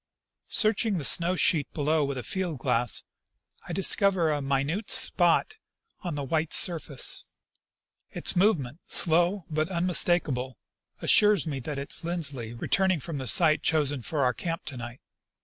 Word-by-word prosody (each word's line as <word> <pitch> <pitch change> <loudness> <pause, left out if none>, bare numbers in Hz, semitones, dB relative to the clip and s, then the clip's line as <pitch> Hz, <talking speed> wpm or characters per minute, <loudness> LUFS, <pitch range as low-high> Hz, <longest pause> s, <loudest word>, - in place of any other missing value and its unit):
Searching 215 -2 +2
the 155 - -5
snow 170 +6 +3
sheet 155 -5 +1
below 155 +1 0
with 140 -1 -4
a 125 - -6
field 180 -5 -4
glass, 120 -1 -1 0.6
I - - -7
discover 190 -2 +2
a 145 -1 -2
minute 140 +9 -3
spot 180 - +2 0.4
on 175 -4 -6
the 145 - -5
white 155 +3 -2
surface. 160 -6 +2 0.9
Its - - -2
movement, 170 - 0
slow 175 +3 +3
but 155 +2 -2
unmistakable, 170 - 0 0.5
assures 210 -7 +4
me 140 -4 -5
that 140 +3 -7
it 140 0 -7
is - - -6
Lindsley 140 -9 -2
returning 185 +8 0
from 145 +1 -6
the 130 - -6
site 155 +4 +4
chosen 145 -4 -1
for 145 +4 -2
our 125 -1 +1
camp 165 +6 -6
to 145 -4 -8
night. 120 +1 -9
160 Hz, 150 wpm, -26 LUFS, 140-180 Hz, 0.9 s, assures